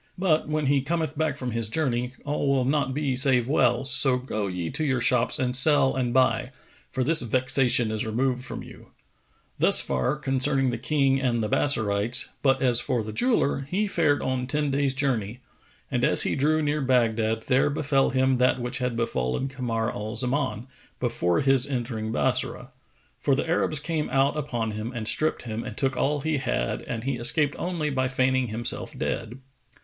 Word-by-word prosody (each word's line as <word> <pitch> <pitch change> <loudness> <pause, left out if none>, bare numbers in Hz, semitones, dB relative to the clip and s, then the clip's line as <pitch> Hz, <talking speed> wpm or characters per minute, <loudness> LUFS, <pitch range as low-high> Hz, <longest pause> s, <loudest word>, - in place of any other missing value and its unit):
But, 170 -5 +1
when 155 -1 -1
he 140 0 +2
cometh 160 +1 -2
back 155 -2 -1
from 125 -4 -4
his 115 -1 -2
journey, 125 -3 -2
all 145 0 -2
will 135 -2 +2
not 140 0 0
be 140 -1 -1
save 130 -2 +2
well[FN#458]: 125 -2 +1
so 135 -1 +4
go 110 -5 -4
ye 90 -3 -4
to 155 - -2
your 135 -4 0
shops 120 0 +1
and 125 -1 -1
sell 135 0 +3
and 125 -2 -1
buy, 130 0 +2 0.4
for 130 - -2
this 155 +3 +6
vexation 125 -1 +1
is 110 -1 -2
removed 125 +3 -1
from - - -6
you." - - -14 0.7
Thus - - +5
far 70 - 0
concerning 135 -1 +1
the 120 - -4
King 135 0 +1
and 120 -4 0
the - - -1
Bassorites; 110 -3 +2
but 135 -1 +2
as 120 -2 +5
for 120 -2 -1
the 110 0 -7
jeweller, 145 - 0
he 200 +5 0
fared 165 -7 +1
on 130 -1 -2
ten 150 0 0
days' 135 -1 0
journey, 125 -4 -2 0.5
and - - -1
as - - +5
he - - 0
drew 155 +3 +1
near 150 +1 -1
Baghdad, 115 -4 +1
there 130 +3 +2
befel 140 -2 +1
him 130 -1 +1
that 125 0 +2
which 125 +2 -3
had 125 -2 -2
befallen 115 - -2
Kamar 120 -4 -2
al 110 +2 -6
Zaman, 125 -2 -2 0.3
before 85 -1 0
his 135 -1 +4
entering 120 -5 -3
Bassorah; 130 +1 -1 0.5
for 140 - +1
the 145 - -1
Arabs[FN#459] 155 -3 0
came 160 -2 -2
out 135 +2 +1
upon 120 -7 -3
him 110 +3 -5
and 110 -2 -4
stripped 155 +6 +1
him 115 -1 -5
and 105 - -8
took 135 -1 0
all 145 +3 0
he 155 0 -1
had - - -2
and 115 -1 -6
he 135 -1 -2
escaped 145 +5 +1
only 170 -4 -2
by 130 -1 0
feigning 130 0 +1
himself 115 +2 -5
dead. 115 +2 -4
130 Hz, 185 wpm, -25 LUFS, 120-140 Hz, 0.7 s, this